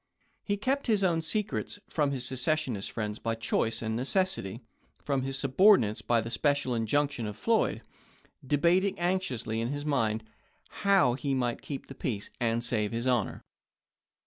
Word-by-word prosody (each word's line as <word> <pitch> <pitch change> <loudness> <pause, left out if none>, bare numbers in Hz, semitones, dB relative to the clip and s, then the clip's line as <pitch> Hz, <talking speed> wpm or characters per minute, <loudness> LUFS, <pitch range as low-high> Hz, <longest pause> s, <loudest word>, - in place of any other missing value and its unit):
He 205 -1 -1
kept 265 +7 -1
his 210 -4 +3
own 170 -3 +2
secrets, 210 +5 -2
from 150 -3 +1
his 130 -3 -1
secession 130 -3 0
friends 105 +1 -4
by 115 0 -1
choice 115 0 0
and 110 0 -1
necessity, 130 - -1 0.4
from 140 -2 0
his 135 +1 -2
subordinates 135 - +4
by 120 -1 +2
the 115 +1 -6
special 140 +1 +1
injunction 120 +2 0
of 105 0 -6
Floyd; 225 - +1 0.6
debating 170 +8 +2
anxiously 135 -12 -1
in 115 - -1
his 145 +3 -3
own 150 - -3
mind 110 -5 +1 0.5
how 195 -11 +3
he 135 +1 -1
might 120 -2 -1
keep 140 -2 -6
the - - -10
peace 110 -7 -4
and 115 0 0
save 110 -3 0
his 115 +1 -3
honor. 125 -5 0
130 Hz, 160 wpm, -29 LUFS, 115-165 Hz, 0.6 s, subordinates